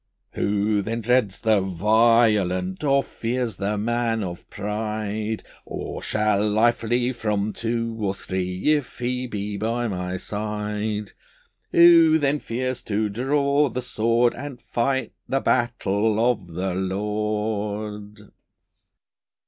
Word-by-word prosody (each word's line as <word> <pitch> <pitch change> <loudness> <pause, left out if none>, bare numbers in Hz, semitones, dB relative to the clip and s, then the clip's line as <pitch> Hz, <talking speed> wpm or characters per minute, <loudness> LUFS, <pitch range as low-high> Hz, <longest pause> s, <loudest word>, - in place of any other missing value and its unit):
Who 105 +1 +1
then 115 +3 -3
dreads 115 -4 +1
the 110 -2 +4
violent, 100 - +2
Or 140 -1 +3
fears 120 -4 -3
the 105 +2 -1
man 115 0 0
of 85 -2 -7
pride? 105 +1 -3 0.2
Or - - -6
shall 105 0 +1
I 120 +2 +6
flee 120 +2 0
from 105 -3 -1
two 115 0 -2
or 100 -2 -1
three 95 +6 -1
If 145 -5 -2
He 125 +1 -2
be 105 -2 -4
by 115 +3 -1
my 90 -2 -3
side? 105 +1 -3 0.6
Who 165 -2 +7
then 145 -1 +1
fears 130 +1 -3
to 105 0 0
draw 140 +5 +2
the 125 +2 -4
sword, 120 0 +2
And 145 -4 -7
fight 130 +3 -1 0.2
the 135 - +2
battle 110 -4 +1
of 100 -7 -6
the 95 +1 -1
Lord! 105 +1 -3
110 Hz, 120 wpm, -24 LUFS, 105-120 Hz, 0.6 s, Who